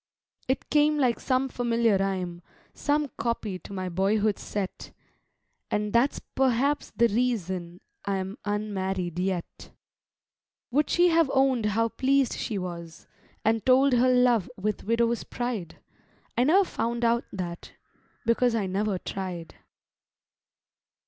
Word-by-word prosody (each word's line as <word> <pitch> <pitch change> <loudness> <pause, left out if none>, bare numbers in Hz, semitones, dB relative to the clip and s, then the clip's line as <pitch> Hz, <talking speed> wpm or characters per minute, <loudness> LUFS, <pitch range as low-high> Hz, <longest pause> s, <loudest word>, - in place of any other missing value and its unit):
It 260 +1 -1
came 300 +1 +4
like 250 -5 +2
some 260 0 +1
familiar 235 -3 +1
rhyme, 185 -3 -2 0.3
Some 290 0 0
copy 225 -5 -2
to - - -12
my 185 -2 -3
boyhood 200 +3 +1
set; 200 -2 -5 0.8
And 210 0 -1
that's 240 +4 +3
perhaps 265 +2 0
the 235 - +3
reason 190 -7 -2 0.2
I'm 195 0 -3
Unmarried 190 -4 -2
yet. 185 -2 -3 1.0
Would 295 +4 +2
she 350 0 +4
have 330 -3 +3
own'd 265 -5 +3
how 225 +2 +1
pleased 270 +2 +2
she 215 - -3
was, 170 -3 -7 0.4
And 220 0 +2
told 260 +1 +5
her 250 +1 +4
love 250 -5 +3
with 210 +2 -2
widow's 230 +1 +1
pride? 235 -9 -4 0.6
I 245 - +3
never 370 +8 +5
found 235 -4 -2
out 235 +1 +2
that, 175 -3 -6 0.5
because 230 +1 +3
I 215 -3 0
never 195 +1 -1
tried. 180 -3 -5
225 Hz, 125 wpm, -27 LUFS, 190-250 Hz, 1.0 s, told